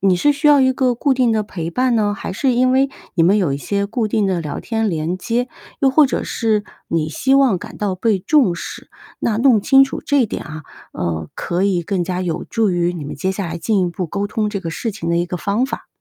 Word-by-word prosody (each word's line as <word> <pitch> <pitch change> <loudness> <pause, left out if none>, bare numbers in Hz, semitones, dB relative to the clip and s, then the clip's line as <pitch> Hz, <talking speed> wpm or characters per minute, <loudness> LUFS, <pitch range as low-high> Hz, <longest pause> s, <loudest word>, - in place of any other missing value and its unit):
你 190 -2 +3
是 290 +10 +3
需 290 +2 -1
要 290 -2 +6
一 260 0 +4
个 255 -1 +1
固 265 +3 +1
定 255 -2 +2
的 220 -1 +1
陪 170 -4 -5
伴 250 +4 +1
呢， 205 -2 +1
还 - - -5
是 255 +5 +1
因 255 +1 +3
为 270 +1 +3 0.3
你 170 - +3
们 185 +5 +4
有 170 -8 +1
一 - - -1
些 200 +7 -2
固 225 +1 -2
定 210 -1 +1
的 185 -3 0
聊 150 -3 -5
天 225 -2 -1
连 165 +1 -2
接， 240 +6 -1 0.3
又 270 -1 +4
或 290 +1 +5
者 - - -2
是 215 -3 0 0.2
你 160 -2 0
希 265 - +1
望 265 -9 +4
感 - - -10
到 200 -3 -1
被 205 +1 +1
重 250 - +3
视？ - - -8 0.3
那 220 - 0
弄 240 -4 +4
清 270 +5 +6
楚 - - -6
这 285 -4 +3
点 - - -5
啊， 155 +1 -8 0.3
呃， 80 -2 -3
可 175 +2 -2
以 185 -3 +1
更 185 +1 -1
加 180 +1 -2
有 175 -1 -3
助 220 -4 0
于 175 0 0
你 160 -5 -6
们 145 - -6
接 185 +6 -2
下 190 -1 -3
来 170 +1 -4
进 205 +4 +1
一 180 - +1
步 175 +1 -4
沟 200 +5 -2
通 210 0 -1
这 205 - -3
个 170 -4 -5
事 225 +7 -3
情 180 -5 -6
的 170 - +1
一 175 +1 0
个 180 - -4
方 205 +7 0
法。 - - -6
200 Hz, 275 characters per minute, -19 LUFS, 175-245 Hz, 0.3 s, 要